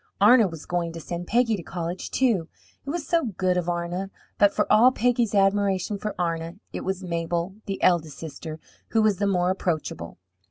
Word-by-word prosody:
Arna 220 +2 +7
was 165 -4 -9
going 175 -1 -1
to 165 - -6
send 175 +2 -6
Peggy 235 -1 +2
to 190 - -6
college, 175 +1 -5
too 220 -11 +1 0.3
it 275 - -7
was 320 0 -3
so 335 +3 +2
good 185 -1 +2
of 175 -1 -1
Arna! 175 +2 -2 0.3
But 205 -1 +6
for - - +1
all 235 +4 +7
Peggy's 240 -3 +1
admiration 195 0 +2
for 210 0 -4
Arna, 165 -1 -2 0.2
it - - -4
was 190 0 -3
Mabel, 170 +2 -2
the 195 -1 -3
eldest 160 -5 +2
sister, 155 0 -7 0.3
who 225 -1 +2
was 210 -3 +3
the 200 - +1
more 180 -2 +2
approachable. 155 - -3
185 Hz, 190 wpm, -25 LUFS, 170-210 Hz, 0.3 s, Arna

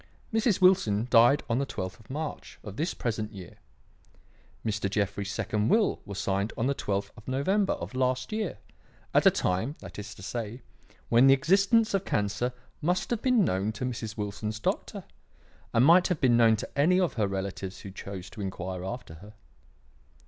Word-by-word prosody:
Mrs. 225 -2 +2
Wilson 120 - +4
died 120 +5 +6
on 115 +2 +1
the 140 - 0
twelfth 95 +1 -5
of 110 - -20
March 150 +3 -5
of 105 -2 -8
this 160 +8 -2
present 110 -2 -3
year. 95 -3 -10 1.1
Mr. 105 -2 -1
Jeffrey's 100 0 -1
second 110 0 -1
will 220 -2 +2
was 100 -1 -7
signed 100 +2 -1
on 115 - 0
the 140 - +2
twelfth 100 -5 -2
of 115 - -15
November 190 +10 +1
of - - -7
last 130 0 0
year; 215 -4 -2 0.6
at - - +5
a - - +11
time, 105 +11 -1
that - - -10
is 105 +2 -7
to 100 - -12
say, 115 +3 -5 0.5
when 120 +3 +6
the 135 - +8
existence 195 - +3
of 195 -1 +1
cancer 105 - -1 0.3
must 180 +8 0
have 235 -2 0
been 250 -6 +3
known 95 - 0
to 120 +4 -4
Mrs. 115 -3 -4
Wilson's 105 +1 -4
doctor, - - -2 0.7
and 115 +2 +4
might 175 +4 +6
have 180 -5 -1
been 125 -3 +4
known 115 -1 +5
to 110 - -6
any 165 +6 +4
of 180 -3 +1
her 105 -4 0
relatives 95 -1 -4
who 100 - -8
chose 95 -1 -7
to 110 - -8
inquire 95 -1 -4
after 105 -3 -6
her. 105 +2 -13
115 Hz, 185 wpm, -28 LUFS, 100-145 Hz, 1.1 s, a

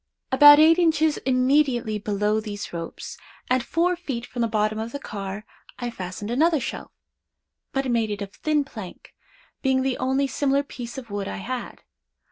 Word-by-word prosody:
About 290 +2 +9
eight 320 +3 +6
inches 315 -3 +3
immediately 255 -4 +2
below 210 +1 0
these 205 -3 -6
ropes, 165 -1 -7 0.3
and 255 -1 +3
four 350 +6 +1
feet 270 -9 -5
from 245 - -5
the 230 - +2
bottom 215 0 0
of 225 +1 -4
the - - -2
car 200 -3 -6 0.3
I 245 -1 -4
fastened 190 +1 -6
another 315 +5 +3
shelf—but 270 +2 -8
made 220 -3 0
of 200 -1 -6
thin 305 -1 0
plank, 215 -9 -10 0.5
being 265 -1 +2
the 265 -1 -1
only 265 +2 +1
similar 280 0 +1
piece 245 -3 -8
of 240 -5 -8
wood 205 -1 -3
I 95 - -5
had. 95 - -6
245 Hz, 160 wpm, -24 LUFS, 210-280 Hz, 0.5 s, About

